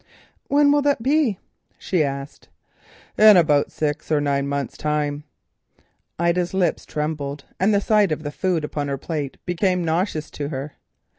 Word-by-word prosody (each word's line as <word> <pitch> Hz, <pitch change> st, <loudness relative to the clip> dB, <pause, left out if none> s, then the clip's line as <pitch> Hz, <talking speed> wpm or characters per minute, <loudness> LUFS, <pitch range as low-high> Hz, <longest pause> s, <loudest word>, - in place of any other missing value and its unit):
"When 285 Hz, 0 st, +4 dB
will 290 Hz, 0 st, +3 dB
that 280 Hz, -5 st, +1 dB
be?" 275 Hz, -6 st, +2 dB, 0.4 s
she 180 Hz, -5 st, 0 dB
asked. 140 Hz, 0 st, -6 dB, 0.7 s
"In 215 Hz, -2 st, +9 dB
about 150 Hz, -4 st, +3 dB
six 150 Hz, 0 st, -3 dB
or 150 Hz, -, +3 dB
nine 140 Hz, -1 st, 0 dB
months' 140 Hz, -2 st, -3 dB
time." 150 Hz, -1 st, -2 dB, 0.9 s
Ida's 170 Hz, +2 st, 0 dB
lips 180 Hz, -4 st, 0 dB
trembled, 150 Hz, -2 st, -4 dB
and 195 Hz, +3 st, +3 dB
the 200 Hz, -1 st, +2 dB
sight 210 Hz, -4 st, +3 dB
of 155 Hz, 0 st, -2 dB
the 145 Hz, -, -4 dB
food 175 Hz, 0 st, -1 dB
upon 150 Hz, -1 st, -3 dB
her 140 Hz, -1 st, -2 dB
plate 145 Hz, -1 st, -4 dB
became 180 Hz, 0 st, 0 dB
nauseous 160 Hz, -1 st, -1 dB
to 145 Hz, -1 st, -5 dB
her. 145 Hz, 0 st, -5 dB
155 Hz, 155 wpm, -22 LUFS, 145-190 Hz, 0.9 s, In